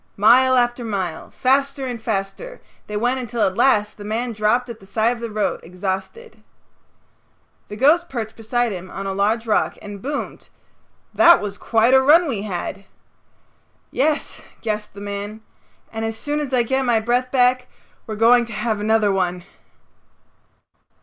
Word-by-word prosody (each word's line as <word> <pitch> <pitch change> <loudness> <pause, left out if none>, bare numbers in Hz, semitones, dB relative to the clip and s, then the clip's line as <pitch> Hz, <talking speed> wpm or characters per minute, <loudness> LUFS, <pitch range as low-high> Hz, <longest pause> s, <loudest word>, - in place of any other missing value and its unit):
Mile 255 +5 +5
after 240 0 +1
mile, 195 -7 -4
faster 275 +1 0
and 245 -3 -5
faster, 220 - -4 0.3
they 210 - -4
went 245 +4 0
until 240 -2 -2
at 190 -1 -1
last 210 -5 +2
the 205 - -9
man 230 +4 -2
dropped 220 +4 +1
at 235 -2 -8
the 195 - -17
side 220 +3 +1
of - - -11
the 235 0 -5
road 210 -1 -1
exhausted. 190 - -6 1.3
The 205 - -8
ghost 315 +9 +3
perched 225 -4 -5
beside 235 +1 -1
him 185 -1 -7
on 195 +1 -6
a 195 - -2
large 215 +4 0
rock 220 - 0
and 205 -1 -9
boomed, 285 +4 -5 0.6
"That 340 +1 +7
was 205 -1 -6
quite 230 +2 +2
a 265 - +7
run 320 +6 +5
we 230 -8 -2
had." 195 0 -5 1.1
"Yes" 300 +2 -1 0.2
gasped 210 -2 -4
the 200 - -9
man, 205 +2 -6 0.5
"and 225 0 -4
as 225 0 -3
soon 295 +4 -2
as 290 -3 -4
I 250 -2 +3
get 265 +3 0
my 240 -3 +2
breath 245 +3 0 0.8
we're 220 - -4
going 235 +2 +5
to 230 - -9
have 215 0 -2
another 215 -1 +2
one." 180 -2 -1
225 Hz, 165 wpm, -21 LUFS, 205-255 Hz, 1.3 s, That